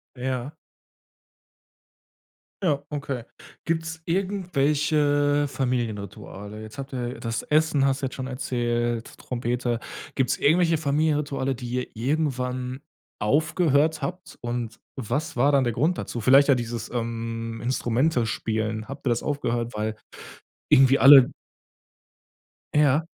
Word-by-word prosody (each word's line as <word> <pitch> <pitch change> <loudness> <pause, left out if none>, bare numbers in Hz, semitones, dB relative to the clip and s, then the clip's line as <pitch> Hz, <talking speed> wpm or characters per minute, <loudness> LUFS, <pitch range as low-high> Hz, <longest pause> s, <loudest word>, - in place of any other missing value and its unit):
Ja. 130 +1 -3 2.1
Ja, 150 -7 +2
okay. 140 -5 -4 0.4
Gibt's 160 0 -2
irgendwelche 150 -6 +1
Familienrituale? 110 -5 -4
Jetzt 110 +5 -11
habt 135 0 -6
ihr 125 0 -4
das 115 -2 -3
Essen 155 -2 +2
hast 135 0 +1
du - - +1
jetzt - - -6
schon 130 0 -5
erzählt, 120 -2 -2
Trompete. 120 -1 -2 0.3
Gibt's 130 -2 +1
irgendwelche 165 +2 +3
Familienrituale, 145 -3 0
die 125 -1 -7
ihr 125 0 -1
irgendwann 130 -1 -2 0.4
aufgehört 155 - +2
habt? 180 +6 -6
Und, 120 -2 -4 0.2
was 145 +5 -3
war 135 +4 +4
dann 135 -2 +4
der 120 - 0
Grund 155 +10 +1
dazu? 120 - -4
Vielleicht 135 +5 +6
ja 140 - +7
dieses, 120 -2 -4
ähm, 115 -1 -4
Instrumente 125 +1 +1
spielen, 110 -1 -2
habt 135 +1 -9
ihr - - +3
das 120 - 0
aufgehört, 120 -5 -2
weil 110 0 -2 0.7
irgendwie 135 +1 +6
alle 135 -2 +9 1.4
Ja. 150 +1 +3
130 Hz, 120 wpm, -25 LUFS, 120-145 Hz, 2.1 s, alle